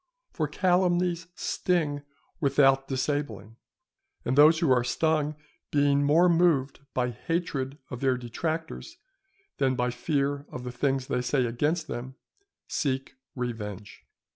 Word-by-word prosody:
For -, -, -1 dB
calumnies 180 Hz, -2 st, +1 dB
sting 155 Hz, -6 st, 0 dB, 0.4 s
without 135 Hz, -2 st, +3 dB
disabling; 130 Hz, -6 st, -3 dB, 0.7 s
and 125 Hz, -, 0 dB
those 155 Hz, +3 st, +7 dB
who 160 Hz, -4 st, +2 dB
are 125 Hz, -1 st, +4 dB
stung 155 Hz, +3 st, 0 dB, 0.3 s
being 145 Hz, -1 st, +3 dB
more 160 Hz, +5 st, +5 dB
moved 165 Hz, -6 st, +2 dB, 0.2 s
by 125 Hz, -1 st, +1 dB
hatred 140 Hz, 0 st, -3 dB
of 125 Hz, -, -5 dB
their 130 Hz, -2 st, +2 dB
detractors 160 Hz, -, -4 dB, 0.6 s
than 130 Hz, -2 st, +2 dB
by 125 Hz, 0 st, 0 dB
fear 140 Hz, +2 st, -1 dB
of 125 Hz, -, -7 dB
the 125 Hz, -, -5 dB
things 135 Hz, +1 st, 0 dB
they 125 Hz, -1 st, -1 dB
say 125 Hz, +1 st, +1 dB
against 150 Hz, +8 st, -1 dB
them, 130 Hz, -1 st, -6 dB, 0.5 s
seek 135 Hz, -2 st, -2 dB, 0.2 s
revenge. 105 Hz, -5 st, -5 dB
140 Hz, 125 wpm, -27 LUFS, 125-160 Hz, 0.7 s, those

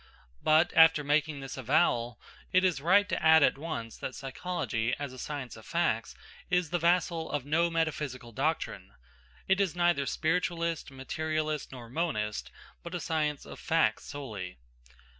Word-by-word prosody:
But, 155 Hz, +3 st, +4 dB
after 160 Hz, -2 st, +7 dB
making 145 Hz, 0 st, +1 dB
this 135 Hz, 0 st, -7 dB
avowal, 120 Hz, -3 st, +1 dB, 0.3 s
it 185 Hz, +1 st, +4 dB
is 175 Hz, -7 st, +1 dB
right 200 Hz, +6 st, +4 dB
to -, -, -2 dB
add 160 Hz, -1 st, +7 dB
at 135 Hz, -, +3 dB
once 150 Hz, -8 st, -5 dB
that 130 Hz, -, -5 dB
psychology, 135 Hz, -, -2 dB
as 140 Hz, -3 st, -5 dB
a 130 Hz, -, -10 dB
science 140 Hz, -4 st, -5 dB
of -, -, -12 dB
facts, -, -, -1 dB, 0.3 s
is 180 Hz, -3 st, +1 dB
the 175 Hz, -, +1 dB
vassal 170 Hz, -1 st, +1 dB
of 145 Hz, -3 st, -2 dB
no 165 Hz, +4 st, +2 dB
metaphysical 150 Hz, -7 st, -2 dB
doctrine. -, -, -2 dB, 0.5 s
It 190 Hz, +1 st, +3 dB
is 185 Hz, -4 st, 0 dB
neither 175 Hz, -6 st, +2 dB
spiritualist, 170 Hz, -1 st, -1 dB
materialist, 155 Hz, +3 st, -3 dB
nor 125 Hz, -3 st, -9 dB
monist, 115 Hz, -7 st, -2 dB, 0.3 s
but 170 Hz, +1 st, -7 dB
a -, -, -2 dB
science 150 Hz, -3 st, -1 dB
of -, -, -10 dB
facts -, -, +1 dB
solely. 105 Hz, -11 st, -6 dB
155 Hz, 155 wpm, -30 LUFS, 135-170 Hz, 0.5 s, after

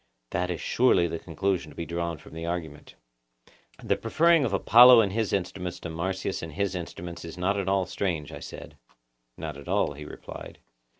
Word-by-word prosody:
That 90 Hz, +1 st, -1 dB
is 90 Hz, -, -3 dB
surely 120 Hz, -8 st, +3 dB
the 85 Hz, 0 st, -4 dB
conclusion 90 Hz, 0 st, -2 dB
to -, -, -14 dB
be 85 Hz, -, -4 dB
drawn 85 Hz, -1 st, -3 dB
from -, -, -15 dB
the 80 Hz, 0 st, -6 dB
argument. 85 Hz, -4 st, -5 dB, 0.9 s
The -, -, +2 dB
preferring 165 Hz, +7 st, +3 dB
of 115 Hz, -, -1 dB
Apollo 120 Hz, +5 st, +8 dB
and 100 Hz, -3 st, -1 dB
his 110 Hz, -1 st, 0 dB
instruments 90 Hz, -2 st, -3 dB
to 80 Hz, -, -5 dB
Marsyas 95 Hz, +3 st, -3 dB
and 80 Hz, -2 st, -7 dB
his 100 Hz, +1 st, -1 dB
instruments 85 Hz, -1 st, -6 dB
is 85 Hz, +1 st, -8 dB
not 95 Hz, +3 st, +1 dB
at 100 Hz, -2 st, -1 dB
all 95 Hz, -1 st, +2 dB
strange, 85 Hz, -8 st, -3 dB
I -, -, -8 dB
said. -, -, -10 dB, 0.6 s
Not 75 Hz, -3 st, -6 dB
at 70 Hz, -, -12 dB
all, 75 Hz, -, +1 dB
he 75 Hz, +1 st, -9 dB
replied. -, -, -9 dB
90 Hz, 190 wpm, -27 LUFS, 80-100 Hz, 0.9 s, Apollo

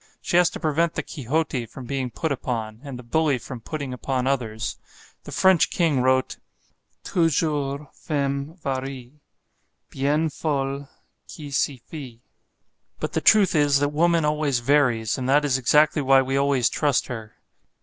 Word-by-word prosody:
She -, -, -3 dB
has 175 Hz, -1 st, +5 dB
to -, -, -8 dB
prevent 160 Hz, +1 st, 0 dB
the -, -, -2 dB
Quixote 135 Hz, -2 st, -2 dB
from 125 Hz, +3 st, -10 dB
being 130 Hz, 0 st, -2 dB
put 160 Hz, +6 st, -3 dB
upon, 115 Hz, -5 st, -3 dB
and 140 Hz, -3 st, -7 dB
the 125 Hz, -, -10 dB
bully 150 Hz, +3 st, +1 dB
from 125 Hz, -1 st, -8 dB
putting 140 Hz, +1 st, -5 dB
upon 130 Hz, 0 st, -2 dB
others. 115 Hz, -5 st, -2 dB, 0.5 s
The -, -, -8 dB
French 190 Hz, -3 st, +4 dB
King 160 Hz, -7 st, +1 dB
wrote 130 Hz, 0 st, +1 dB, 0.7 s
"Toujours 150 Hz, -4 st, 0 dB
femme 140 Hz, +1 st, -3 dB
varie 135 Hz, +1 st, -5 dB, 0.7 s
Bien 145 Hz, +4 st, +1 dB
fol 140 Hz, -2 st, -2 dB, 0.4 s
qui 150 Hz, -3 st, -8 dB
s'y 135 Hz, -2 st, -1 dB
fie," 125 Hz, -7 st, -9 dB, 0.8 s
but -, -, -3 dB
the -, -, 0 dB
truth 205 Hz, -4 st, +5 dB
is 145 Hz, -3 st, +4 dB
that 145 Hz, +1 st, +1 dB
woman 165 Hz, +1 st, +2 dB
always 150 Hz, -3 st, +1 dB
varies, 120 Hz, -3 st, +2 dB
and 130 Hz, 0 st, -2 dB
that 145 Hz, +2 st, +4 dB
is 135 Hz, -2 st, +1 dB
exactly 150 Hz, +4 st, +3 dB
why 135 Hz, -1 st, +5 dB
we 135 Hz, +1 st, -2 dB
always 140 Hz, -3 st, +2 dB
trust 145 Hz, -4 st, +1 dB
her. 110 Hz, -3 st, -8 dB
140 Hz, 155 wpm, -24 LUFS, 130-150 Hz, 0.8 s, has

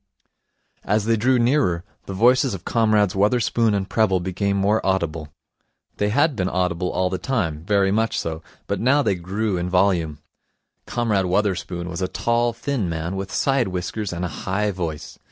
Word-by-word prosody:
As 105 Hz, 0 st, +1 dB
they 115 Hz, 0 st, +3 dB
drew 125 Hz, +4 st, +2 dB
nearer, 120 Hz, -, +2 dB, 0.2 s
the 95 Hz, -, -4 dB
voices 125 Hz, +3 st, +3 dB
of 95 Hz, -, -11 dB
Comrades 110 Hz, -4 st, +2 dB
Wotherspoon 110 Hz, +1 st, +2 dB
and 95 Hz, -1 st, -2 dB
Prebble 105 Hz, -5 st, +2 dB
became 100 Hz, +3 st, -1 dB
more 100 Hz, +3 st, +2 dB
audible. 85 Hz, -5 st, -1 dB, 0.7 s
They 105 Hz, -, +1 dB
had 145 Hz, +6 st, +2 dB
been 95 Hz, -3 st, -1 dB
audible 90 Hz, 0 st, -1 dB
all 90 Hz, 0 st, 0 dB
the 95 Hz, -, -2 dB
time, 85 Hz, -, -2 dB
very 100 Hz, -1 st, +2 dB
much 110 Hz, +2 st, +1 dB
so, 80 Hz, -1 st, -4 dB, 0.2 s
but -, -, -2 dB
now 140 Hz, +5 st, +3 dB
they 105 Hz, -, +2 dB
grew 95 Hz, +3 st, -2 dB
in 90 Hz, +1 st, -2 dB
volume. 90 Hz, -5 st, +1 dB, 0.7 s
Comrade 105 Hz, -6 st, 0 dB
Wotherspoon 90 Hz, -2 st, -1 dB
was 90 Hz, +1 st, -5 dB
a 95 Hz, -, 0 dB
tall, 120 Hz, +5 st, 0 dB
thin 115 Hz, -4 st, -2 dB
man 85 Hz, +3 st, -3 dB
with 95 Hz, 0 st, -5 dB
side 135 Hz, -4 st, +1 dB
whiskers 95 Hz, +3 st, -3 dB
and 90 Hz, +1 st, -3 dB
a 90 Hz, -, -6 dB
high 105 Hz, +3 st, +1 dB
voice. 85 Hz, -6 st, -5 dB
100 Hz, 170 wpm, -22 LUFS, 90-115 Hz, 0.7 s, they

